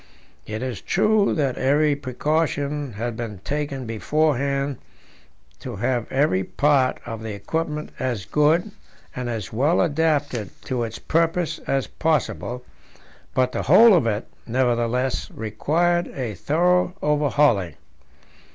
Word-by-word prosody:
It 110 +3 -4
is 125 -5 -4
true 215 -1 +2
that 140 -5 0
every 145 +2 +3
precaution 145 0 -1
had 115 +3 -3
been 110 -3 -5
taken 145 -3 -3
beforehand 140 +3 0 0.8
to - - -6
have 120 +3 -1
every 135 -9 +2
part 140 +2 +2
of 115 -2 -6
the 110 -1 -5
equipment 150 +7 -3
as 120 -7 -2
good 160 +7 +2 0.4
and 125 -1 -3
as 110 -4 -4
well 140 +9 +2
adapted 145 - +1
to 125 -2 -2
its 115 0 -7
purpose 165 0 0
as 135 -1 +1
possible, 125 -5 -1 0.7
but 130 0 +2
the - - -2
whole 215 - +7
of 160 -10 +3
it, 105 0 -1 0.2
nevertheless, 125 +1 0
required 165 +11 0
a 125 -5 -3
thorough 180 - +1
overhauling. 145 - +2
135 Hz, 125 wpm, -23 LUFS, 120-155 Hz, 0.8 s, whole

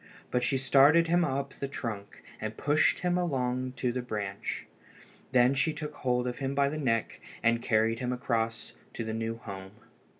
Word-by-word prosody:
But 125 - +2
she 135 - +1
started 140 +5 +6
him 175 +1 +4
up 140 -2 -2
the 140 - -4
trunk 110 -7 -6 0.2
and 110 0 -5
pushed 150 +1 +2
him 180 0 +1
along 130 -6 -1
to 125 -1 -1
the 125 +1 -2
branch. 105 -5 -4 0.7
Then 125 0 +5
she 145 +4 +1
took 150 -1 -5
hold 125 -3 0
of 125 - -4
him 135 0 -2
by 140 0 +3
the 155 +2 -4
neck 115 -6 0 0.2
and 115 0 +3
carried 115 0 +2
him 125 -1 -1
across 115 -3 -1 0.2
to 115 - -4
the 110 0 -3
new 115 0 -2
home. 95 -4 -8
125 Hz, 180 wpm, -29 LUFS, 115-140 Hz, 0.7 s, started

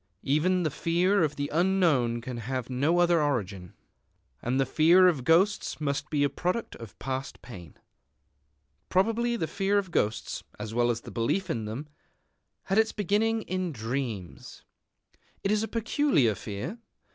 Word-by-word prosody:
Even 175 +6 +2
the 155 - 0
fear 175 +6 +1
of 150 -3 +1
the 145 0 -2
unknown 160 -10 +2
can 125 0 -6
have 125 +2 -4
no 145 +7 +1
other 175 -2 +4
origin. 100 -11 -2 0.7
And 125 +3 0
the 135 - +3
fear 170 +7 +5
of 155 -8 +1
ghosts 175 +8 +2
must 140 -2 -2
be 145 -2 +1
a - - +4
product 180 - -3
of 115 -3 -11
past 135 0 -5
pain. 90 - -11 1.1
Probably 230 +5 +1
the 195 - -1
fear 195 +4 0
of 195 -3 -1
ghosts, 105 -6 -1 0.2
as 105 +1 -5
well 120 +1 +2
as 120 -1 -1
the - - -10
belief 165 +11 -1
in 115 -6 -3
them, 120 +8 -5 0.8
had 195 +3 +1
its 220 0 +3
beginning 215 +3 +1
in 185 -2 -2
dreams. 115 - -5 0.8
It 195 - +1
is 210 0 +2
a 220 - -2
peculiar 230 - +2
fear. 105 - -6
155 Hz, 155 wpm, -28 LUFS, 120-190 Hz, 1.1 s, fear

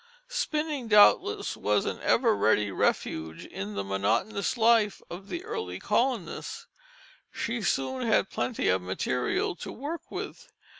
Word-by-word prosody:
Spinning 305 - -2
doubtless 365 - +5
was - - +1
an - - -3
ever 230 -3 +3
ready 105 - +2
refuge 80 -3 -1
in 100 +2 -6
the 100 - -2
monotonous 110 - 0
life 225 -2 +4
of 190 +4 -8
the 345 +1 -4
early 90 0 -4
colonist. 255 - -1 0.7
She 230 0 -3
soon 230 - -1
had 215 - +2
plenty 245 - -1
of 95 0 +3
material 95 - -1
to - - -7
work 300 +7 -6
with. - - -7
210 Hz, 135 wpm, -28 LUFS, -, 0.7 s, doubtless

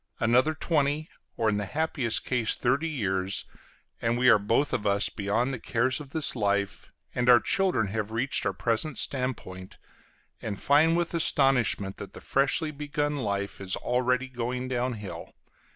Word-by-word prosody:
Another 125 +7 +3
twenty, 155 -1 0 0.3
or 115 - +1
in 105 -1 0
happiest 125 +1 -1
case 125 -4 +1
thirty 140 +7 0
years, 95 -8 -1 0.6
and 115 +1 0
we 125 0 +4
are 110 - +6
both 115 +8 +1
of 105 - -1
us 100 0 +2
beyond 115 +6 -1
the 125 - -4
cares 125 +3 0
of 145 -2 -10
this 155 -1 +1
life, 100 -3 -1 0.2
and 125 0 +1
our 120 -1 +8
children 180 - +1
have 105 0 -3
reached 120 +4 0
our 100 - -1
present 115 - -1
standpoint, 115 -9 -3 0.6
and 100 -3 -5
find 160 +4 +4
with 175 0 -1
astonishment 135 -11 +2
that 100 - -9
the - - -9
freshly 145 +3 +1
begun 145 0 -2
life 100 -6 -3
is 95 -1 -1
already 125 +1 0
going 125 0 -4
down 125 0 -1
hill. 105 -4 -8
125 Hz, 160 wpm, -27 LUFS, 105-145 Hz, 0.6 s, our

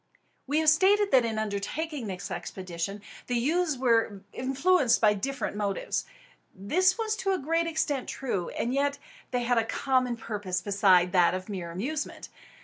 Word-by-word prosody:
We 290 +3 0
have 315 - +5
stated 400 +5 +3
that, 255 -3 +5
in 225 -1 -2
undertaking 220 +7 -3
this 190 0 -6
expedition, 185 +2 -5 0.2
the 245 - -1
youths 305 +5 +1
were 225 -5 +1
influenced 270 +2 +2
by 210 -2 +5
different 270 +3 -3
motives. 205 -2 -2 0.5
This 365 - +2
was 440 -1 -1
to 390 -1 0
a - - +1
great 330 +3 0
extent 295 -5 -1
true; 205 -10 -3
and 240 - -1
yet 280 +1 +1 0.3
they 250 -1 -1
had 240 0 +2
a - - +1
common 255 +1 0
purpose 205 -5 -3
beside 190 -3 +3
that 180 -2 +4
of 185 +2 -6
mere 185 -4 -5
amusement. 260 - -4
240 Hz, 160 wpm, -28 LUFS, 200-300 Hz, 0.5 s, have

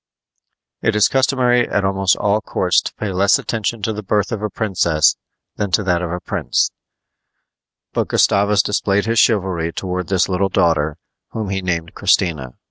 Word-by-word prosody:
It 110 - 0
is 105 - +4
customary 125 -2 +2
at 100 - 0
almost 95 -1 +2
all 105 +1 0
courts 90 -4 +1
to - - -6
pay 105 -2 -4
less 100 +2 +3
attention 115 -1 -3
to 110 - -1
the 105 - -5
birth 105 +1 -1
of 110 -3 -3
a 105 - -2
princess 85 -9 +1 0.4
than 105 -1 -2
to 105 - +3
that 90 -2 0
of 85 -2 -3
a 90 - -3
prince; - - -1 1.2
but - - -1
Gustavus 100 0 +3
displayed 100 0 0
his 115 0 +1
chivalry 95 -7 +1
toward 90 0 -4
this 95 -2 +1
little 95 +1 0
daughter, 80 -4 +1 0.4
whom 110 -3 -4
he 95 -1 -2
named 85 -3 -3
Christina. 75 -9 0
100 Hz, 170 wpm, -19 LUFS, 90-105 Hz, 1.2 s, is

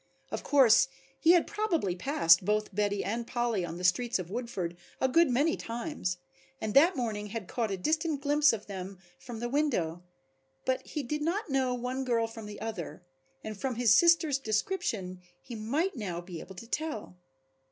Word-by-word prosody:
Of - - -3
course 260 -6 +5 0.3
he 330 +2 +6
had 350 - +4
probably 355 - -1
passed 180 - +4
both 210 +1 0
Betty 205 0 0
and 230 +3 -3
Polly 240 -6 0
on 170 0 -5
the 180 - -7
streets 230 +7 +2
of 185 -1 -7
Woodford 200 -7 -3 0.2
a 260 - +3
good 330 +5 +4
many 285 +7 +2
times 230 - -4 0.4
and 215 -1 -3
that 330 +8 +6
morning 215 -4 -2
had 210 -2 -6
caught 230 -3 -2
a 195 - -2
distant 310 - 0
glimpse 290 +1 +4
of 215 -2 -5
them 190 -1 -7 0.2
from 240 -4 -8
the 240 - -2
window, 240 - 0 0.6
but 260 0 +1
he 300 - -3
did 300 +4 -3
not 340 +2 -1
know 260 -2 +1
one 250 +2 -3
girl 235 -3 +1
from 225 -1 -8
the 205 -1 -8
other, 180 -8 -6 0.4
and 215 -2 -7
from 260 -3 -1
his 235 -2 +4
sister's 330 -4 +5
description 215 - -2 0.2
he 245 - -10
might 275 - -1
now 190 -8 -4
be 175 -1 -8
able 190 - -10
to 205 - -9
tell. 230 - -4
230 Hz, 185 wpm, -30 LUFS, 200-285 Hz, 0.6 s, he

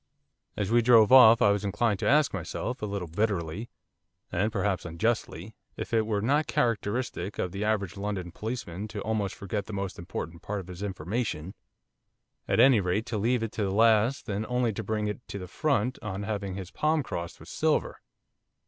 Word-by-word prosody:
As 105 0 -1
we 120 0 +5
drove 115 -2 +6
off 115 -3 +9
I 100 - +6
was 100 0 0
inclined 105 0 0
to - - +1
ask 150 -1 +4
myself, 100 +7 -4
a 105 - -2
little 100 -3 -4
bitterly 95 +2 -2 0.6
and 105 +3 0
perhaps 100 -3 -1
unjustly 90 +1 -2 0.2
if - - -6
it 110 -1 +2
were 105 -2 0
not 145 +5 +2
characteristic 115 -2 -1
of 90 - -2
the 100 +2 -3
average 100 -4 -1
London 100 -3 -3
policeman 105 -3 -5
to 105 -1 -6
almost 105 -2 -1
forget 100 +1 -4
the 110 - -7
most 100 -1 -4
important 85 -2 -6
part 105 0 -3
of 95 -1 -9
his 90 +1 -8
information, 95 -2 -3 0.9
at - - +1
any 130 -4 +7
rate 100 +4 0
to 115 -4 -3
leave 120 +2 +1
it 115 - -3
to 105 - -2
the 100 - 0
last 115 +4 +3
and 105 0 -2
only 125 -2 +1
to 110 - -4
bring 105 +1 -1
it 105 +2 -3
to - - -6
the 90 -2 -7
front 130 - 0
on 100 -2 -4
having 100 -3 -3
his 95 -2 -7
palm 155 0 +1
crossed 85 -7 -5
with - - -13
silver. - - 0
105 Hz, 195 wpm, -28 LUFS, 95-115 Hz, 0.9 s, off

